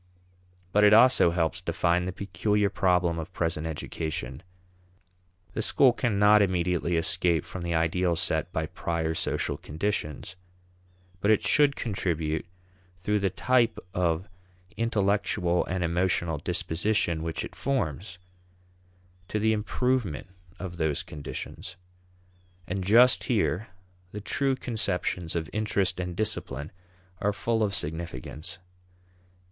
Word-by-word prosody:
But 105 +2 +4
it 105 0 +8
also 125 -5 +6
helps 85 -2 -1
define 90 +1 +1
the 90 - -2
peculiar 100 +2 0
problem 90 -2 +2
of 80 +3 -6
present 80 -2 -1
education. 75 -4 -4 1.1
The - - -1
school 125 +3 +5
cannot 105 -3 +4
immediately 90 -2 +1
escape 80 -1 +1
from 95 - -7
the 85 -1 -1
ideals 85 +1 +1
set 80 +1 -1
by 80 -2 -1
prior 80 0 -2
social - - -1
conditions. 80 0 -3 0.8
But 100 - +1
it 110 - +4
should 145 -2 +4
contribute 85 -7 -2 0.5
through 105 +3 +1
the 100 -1 +1
type 120 +4 +2 0.2
of 90 0 0 0.5
intellectual 100 -5 +1
and 90 0 -1
emotional 85 -2 0
disposition 85 +1 -1
which 80 -1 -3
it - - -10
forms 90 - -2 1.1
to 105 - -2
the 110 +1 +2
improvement 110 - -1 0.3
of 90 -1 -7
those 80 -3 0
conditions. 75 -2 -7 0.9
And 95 +1 -3
just 120 +6 +5
here 110 -3 0 0.5
the 105 - -4
true 135 +5 0
conceptions 90 -9 -2
of 80 -1 -1
interest 100 -4 0
and 90 -1 -3
discipline 80 -9 -2 0.5
are 105 - +1
full 115 +2 -1
of 100 -2 +1
significance. 80 +2 -5
90 Hz, 120 wpm, -27 LUFS, 80-105 Hz, 1.1 s, it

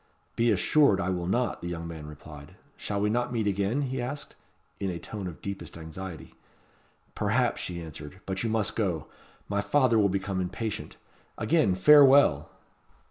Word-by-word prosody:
"Be 115 +1 +2
assured 105 +3 +4
I 95 0 0
will 90 -1 -2
not," 120 +3 0
the 85 - -5
young 85 -1 -5
man 80 -3 -8
replied. 75 -1 -12 0.2
"Shall 100 -1 -3
we 105 +1 +1
not 120 +2 0
meet 115 -3 -1
again?" 100 +7 0
he 130 -1 -3
asked, 140 +4 -5 0.4
in 100 - -2
a 90 - -3
tone 100 +2 -6
of 85 - -9
deepest 95 -5 -6
anxiety. 85 +2 -8 0.8
"Perhaps," - - 0
she 85 -1 -4
answered. 80 +1 -9
"But 95 -1 -3
you 115 - -1
must 110 -2 0
go. 90 -10 -1 0.4
My 100 0 0
father 115 +2 +3
will 100 -1 +4
become 95 0 -2
impatient. 95 +4 -4 0.4
Again 110 - +2
farewell!" 140 - +6
100 Hz, 165 wpm, -28 LUFS, 85-115 Hz, 0.8 s, farewell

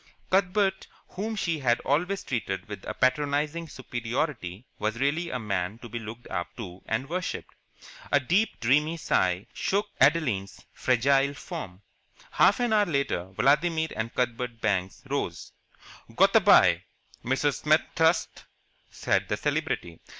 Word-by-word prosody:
Cuthbert, 190 +1 +2 0.2
whom 215 +4 -4
she 170 -6 -1
had 120 -3 +2
always 180 +8 0
treated 95 -7 -3
with 105 -3 -8
a - - -4
patronizing 145 +5 0
superiority, 120 - -4
was 110 +2 -1
really 155 +6 0
a - - -2
man 100 -3 -2
to 120 - -10
be 120 - -4
looked 115 +2 -9
up 90 -2 -2
to 95 -6 -8
and 115 +5 -1
worshipped. 180 +3 -4 0.6
A 145 - +5
deep, 180 - +1
dreamy 150 +7 +2
sigh 95 - +1
shook 205 +1 -1
Adeline's 110 -13 +2
fragile 135 +3 +2
form. 105 - -8 0.5
Half 200 - +4
an 240 -2 +1
hour 210 -1 +4
later 140 - -1
Vladimir 160 - +2
and 110 +1 -3
Cuthbert 125 -1 -2
Banks 95 -4 -1
rose. - - -3 0.6
"Goot - - +4
a - - +9
bye, - - +6 0.4
Mrs. 135 +3 0
Smet 155 +1 +2
thirst," 160 +1 +1 0.4
said - - 0
the - - -1
Celebrity. 85 -2 -2
135 Hz, 140 wpm, -27 LUFS, 110-165 Hz, 0.6 s, a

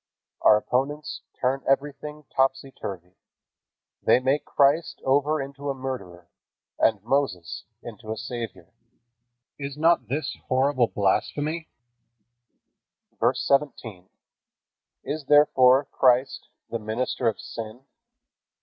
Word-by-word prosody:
Our 105 - +7
opponents 140 +7 -2 0.2
turn 130 +1 0
everything 145 +2 -1
topsy 135 0 +1
turvy. 90 -6 -8 0.8
They - - +5
make 135 +3 0
Christ 145 +4 +2
over 145 +3 +2
into 140 +1 -5
a 135 - -1
murderer, 100 -10 -6 0.5
and 110 -3 +2
Moses 120 -9 -1 0.2
into 110 - -8
a 110 - -3
savior. 115 0 -6 0.9
Is 140 0 -5
not 165 +2 +3
this 145 +5 -3
horrible 130 -1 +2
blasphemy? 150 - -1 1.5
VERSE - - +2
17. 120 -10 -1 0.9
Is 145 +1 -4
therefore 135 -2 +5
Christ 130 +1 +2 0.2
the 115 - -2
minister 115 +3 -2
of 110 - 0
sin? 115 +3 -8
135 Hz, 105 wpm, -25 LUFS, 115-145 Hz, 1.5 s, Our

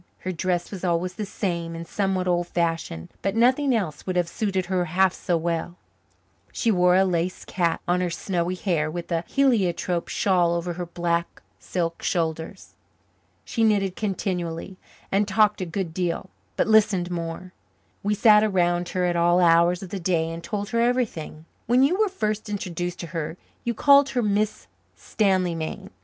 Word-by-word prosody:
Her 185 - -3
dress 180 0 -2
was 195 -3 -7
always 180 0 0
the 210 +1 -5
same 170 -5 -3
and 165 0 -7
somewhat 190 -1 -1
old 175 -1 +1
fashioned, 165 - -2
but 195 +1 -1
nothing 260 +4 +3
else 170 -9 -2
would 185 - -1
have 175 -1 +2
suited 190 0 -1
her 185 -1 0
half 185 +2 +2
so 175 - -1
well; 170 +1 -2 0.8
she 230 - +1
wore 180 -2 +4
a 190 +1 +5
lace 180 0 -1
cap 170 -3 -1
on 180 +1 +2
her 180 - 0
snowy 175 +1 -2
hair 170 -5 0
and 175 +2 -6
a 165 0 0
heliotrope 190 -10 +1
shawl 175 -3 +2
over 170 +1 -2
her 175 0 -5
black 170 0 -2 0.2
silk 170 -2 -3
shoulders. 165 +2 -3 0.7
She 230 - -1
knitted 200 -4 +2
continually 185 -3 -3 0.4
and 200 +1 +2
talked 210 0 +3
a 185 - -2
good 170 -1 -3
deal, 180 +1 -2 0.2
but - - +2
listened 205 -5 +3
more. 170 +2 -5 0.5
We 210 +1 0
sat 210 0 +6
around 175 -4 +1
her 180 -1 0
at 175 -1 0
all 175 +1 +3
hours 170 +1 +4
of 190 - -8
the 195 - -3
day 165 -2 0
and 165 +1 -7
told 205 -2 -4
her 230 -1 +1
everything. 230 -11 -1 0.2
When 250 +2 +4
you 350 +8 +2
were 430 -2 +3
first 215 - -2
introduced 180 -4 -4
to - - -5
her 165 0 -3 0.3
you 235 -1 -2
called 280 +3 +6
her 250 -3 0
Miss 210 0 0 0.3
Stanleymain. 180 -6 -1
180 Hz, 175 wpm, -24 LUFS, 170-205 Hz, 0.8 s, sat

